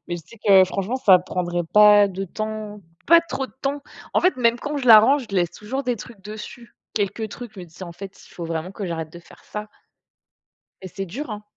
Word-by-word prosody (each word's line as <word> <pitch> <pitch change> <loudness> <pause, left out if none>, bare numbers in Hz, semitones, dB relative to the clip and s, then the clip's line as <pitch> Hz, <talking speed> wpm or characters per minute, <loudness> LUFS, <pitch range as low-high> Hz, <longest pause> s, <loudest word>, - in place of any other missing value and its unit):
Mais 175 - -2
je 170 - -10
sais 230 - -15
que 190 -2 +7
franchement, 195 +6 -3
ça 190 -8 +6
prendrait 175 -1 -3
pas 210 -1 +7
de 195 +1 -5
temps 215 +1 -6 0.3
pas 335 0 +7
trop 270 -5 -4
de - - -22
temps. 280 +1 -2 0.3
En - - +4
fait, 365 -4 +2
même 235 -1 +2
quand 295 +2 -4
je 255 - -4
la 220 -3 +10
range, 265 +3 +3
je 195 - -2
laisse 175 -2 +1
toujours 260 +7 -5
des 245 -1 0
trucs 210 -1 -12
dessus, 215 +3 -10 0.2
quelques 210 +1 -2
trucs, 240 +1 -9
je 190 - -9
me - - -8
dis 165 -1 -20
ça 185 - -8
en 170 - -9
fait, 195 +2 -10
s - - -17
il - - -19
faut 170 - -6
vraiment 165 +2 -4
que 200 - -6
j'arrête 160 -2 -5
de 170 - -10
faire - - -19
ça. 210 0 -7 1.1
Et 185 - -7
c'est 195 +2 -6
dur, 250 - -6
hein! 210 0 -6
210 Hz, 250 wpm, -22 LUFS, 185-235 Hz, 1.1 s, la